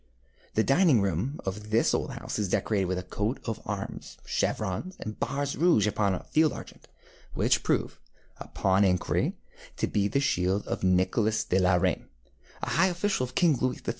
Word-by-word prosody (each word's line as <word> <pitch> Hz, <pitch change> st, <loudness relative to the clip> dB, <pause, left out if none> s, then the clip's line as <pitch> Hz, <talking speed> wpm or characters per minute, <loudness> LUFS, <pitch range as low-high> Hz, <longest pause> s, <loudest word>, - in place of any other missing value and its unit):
The 110 Hz, -, +3 dB
dining 145 Hz, -, +4 dB
room 100 Hz, -, -2 dB
of 105 Hz, +2 st, -5 dB
this 110 Hz, +2 st, +3 dB
old -, -, -1 dB
house -, -, -5 dB
is 100 Hz, -3 st, -1 dB
decorated 100 Hz, +1 st, +1 dB
with 90 Hz, 0 st, -1 dB
a 90 Hz, -, -4 dB
coat 105 Hz, +7 st, -2 dB
of 115 Hz, -2 st, -4 dB
arms, 100 Hz, -2 st, -5 dB
chevrons, 110 Hz, -, -2 dB
and 110 Hz, 0 st, -7 dB
bars 140 Hz, +3 st, -2 dB
rouge 165 Hz, -, +4 dB
upon 100 Hz, -2 st, +1 dB
a -, -, -7 dB
field 155 Hz, -1 st, +2 dB
argent, -, -, -11 dB, 0.5 s
which -, -, +2 dB
prove, -, -, -1 dB, 0.4 s
upon 95 Hz, +1 st, +1 dB
inquiry, 90 Hz, -2 st, +1 dB, 0.4 s
to -, -, +1 dB
be 100 Hz, -1 st, 0 dB
the 115 Hz, +7 st, 0 dB
shield 95 Hz, -6 st, 0 dB
of -, -, -3 dB
Nicholas 95 Hz, +4 st, +2 dB
de 95 Hz, -, +1 dB
la 90 Hz, 0 st, +4 dB
Reynie, 90 Hz, -, 0 dB, 0.6 s
a -, -, -1 dB
high 185 Hz, +4 st, +4 dB
official 180 Hz, -5 st, 0 dB
of 125 Hz, -, -12 dB
King 165 Hz, -5 st, +4 dB
Louis 125 Hz, 0 st, 0 dB
XIV. -, -, -6 dB
105 Hz, 180 wpm, -28 LUFS, 95-140 Hz, 0.6 s, dining